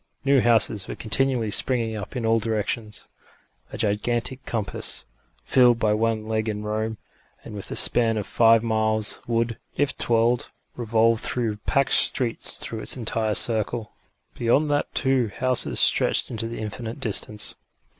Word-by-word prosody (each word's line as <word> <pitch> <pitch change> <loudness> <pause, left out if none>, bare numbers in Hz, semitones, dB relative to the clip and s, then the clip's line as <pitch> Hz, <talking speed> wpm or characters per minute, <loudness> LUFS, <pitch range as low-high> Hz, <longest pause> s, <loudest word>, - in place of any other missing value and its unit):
New 140 -1 +4
houses 110 -4 +3
were - - -6
continually 120 -1 0
springing 115 -1 0
up 105 +5 -7
in 120 -2 -3
all 115 0 +2
directions. 110 0 -3 0.6
A - - -7
gigantic 120 +5 -2
compass, 110 -4 -3 0.4
fixed 125 -3 +4
by 110 -2 +1
one 110 0 -1
leg 110 0 -2
in 105 0 -4
Rome, 110 +1 -3 0.5
and - - -10
with 100 -2 -7
a - - -5
span 115 -2 +3
of 105 - -3
five 115 0 +4
miles, 110 -1 0
would, 115 -1 -1 0.2
if 145 0 0
twirled, 115 +1 0 0.3
revolve 115 -1 +1
through 115 -4 -2
packed 140 -1 +1
streets 120 -4 +2
through 115 - -3
its 110 - -1
entire 110 -2 -1
circle. 110 0 +4 0.4
Beyond 140 +6 +1
that 145 - -1
too 130 -4 +1
houses 125 - +1
stretched - - +2
into 115 -1 -3
the 115 - -7
indefinite 110 +3 -6
distance. 105 -3 -2
115 Hz, 150 wpm, -23 LUFS, 110-120 Hz, 0.6 s, New